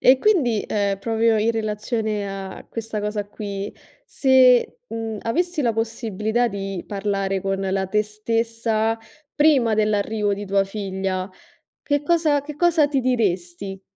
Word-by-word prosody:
E 255 +1 +6
quindi, 260 - +2
ehm, 200 -2 0
proprio 225 +1 +2
in 220 +2 +2
relazione 215 -1 -2
a 195 -1 -7
questa 225 -2 -4
cosa 210 0 -2
qui, 205 -1 -5 0.3
se, 255 -2 +4
mhmm, 225 -1 -4
avessi 345 +7 0
la 235 - +2
possibilità 225 0 -1
di 195 -4 -4
parlare 195 -1 -1
con 195 0 -1
la 190 0 -1
te 210 +2 +2
stessa 225 +1 -1 0.4
prima 280 -7 +4
dell'arrivo 210 -1 +1
di 205 +1 -6
tua 195 0 +3
figlia, 190 -2 -3 0.5
che 290 0 0
cosa 310 -2 +2
che 295 +1 -8
cosa 330 -3 +4
ti 280 -2 0
diresti? 195 -6 -1
215 Hz, 140 wpm, -22 LUFS, 200-240 Hz, 0.5 s, E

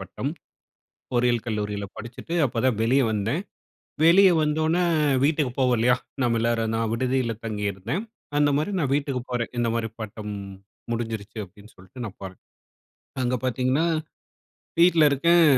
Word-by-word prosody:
பட்டம். - - -4 0.8
பொறியியல் 120 -1 +2
கல்லூரியில 105 -2 -2
படிச்சுட்டு, 120 +8 -7
அப்பதான் 125 -1 +1
வெளிய 130 +5 +3
வந்தேன். 110 - -1 0.7
வெளிய 190 +4 +7
வந்தோன்னே 155 +3 +1 0.4
வீட்டுக்கு 145 -3 +2
போவோம் 125 -2 +3
இல்லையா? 120 +2 +4 0.3
நாம 120 -2 +2
எல்லாரும் 115 -1 0
நான் 115 -1 0
விடுதியில 125 0 0
தங்கியிருந்தேன். 105 - -2 0.3
அந்த 145 0 +4
மாரி 155 +7 -1
நான் 140 -5 0
வீட்டுக்குப் 140 -3 -1
போறேன். 120 -1 -2
"இந்த 120 -1 +1
மாரி 115 -1 -1
பட்டம் 105 -1 -6 0.6
முடிஞ்சிருச்சு." 110 -2 -4
அப்படின்னு 100 +4 -17
சொல்லிட்டு 95 +7 -10
நான் 100 - -8
போறேன். 95 -1 -8 0.8
அங்க 125 0 +1
பாத்தீங்கன்னா, 130 +5 +1 0.9
வீட்ல 170 -2 +6
இருக்கேன். 170 +5 +4
120 Hz, 130 wpm, -25 LUFS, 110-145 Hz, 0.9 s, வெளிய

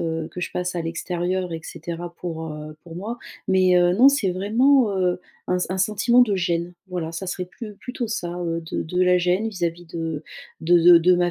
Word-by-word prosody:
heu, 160 -1 -2
que 180 - -6
je - - -3
passe 180 0 -3
à 170 - -2
l'extérieur 175 +2 -2
et 165 - -4
cetera, 170 +1 -7
pour, 160 -2 -5
heu, 150 0 -8
pour 170 -1 -10
moi 220 +6 -4 0.3
mais, 185 -1 +4
heu, 175 0 +4
non 250 +8 +7
c'est 230 -10 +1
vraiment, 230 +5 +3
heu, 180 -1 +1 0.3
un 180 - +1
s - - -1
un 190 - -2
sentiment 215 +5 +4
de 210 -5 +1
gêne, 170 -1 -1 0.2
voilà. 170 -3 -4
Ça 180 +3 -5
serait 180 0 -3
plu 210 +3 -10
plutôt 250 -2 -5
ça, 175 -6 -3
heu, 165 -1 -2
de 160 - -3
de 180 +3 -2
la 180 0 +5
gêne 180 +5 +1
vis-à-vis 175 -4 -3
de 160 -2 -4 0.4
de 175 +2 +4
de 170 0 +8
de 180 +2 +4
ma 175 0 +2
180 Hz, 220 wpm, -23 LUFS, 170-190 Hz, 0.4 s, de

